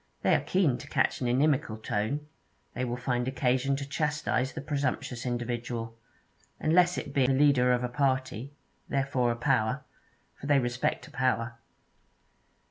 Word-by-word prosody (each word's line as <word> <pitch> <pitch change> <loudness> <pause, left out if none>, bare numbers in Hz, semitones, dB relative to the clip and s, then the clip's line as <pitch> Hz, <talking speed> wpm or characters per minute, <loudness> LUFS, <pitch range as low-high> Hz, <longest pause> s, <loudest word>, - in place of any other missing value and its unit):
They - - +4
are - - +4
keen 160 -10 +1
to 145 - -10
catch - - +1
an 125 - 0
inimical 130 -2 +2
tone; 110 +7 -2 0.5
they 125 - -2
will 120 -1 -2
find 125 -1 -1
occasion 130 +1 +1
to 135 0 -5
chastise 150 -3 0
the - - -5
presumptuous 135 -4 -2
individual, 120 -1 -3 0.6
unless 175 +3 +3
it 145 - -5
be 135 -3 +3
the 135 - +3
leader 135 -2 +4
of 125 0 +1
a - - +1
party, 130 -1 -1 0.4
therefore 135 -3 +1
a - - -1
power; 120 -3 +1 0.5
for 140 - -9
they 145 -1 +5
respect 120 -1 -1
a - - -15
power. 125 -2 0
130 Hz, 155 wpm, -29 LUFS, 120-140 Hz, 0.6 s, they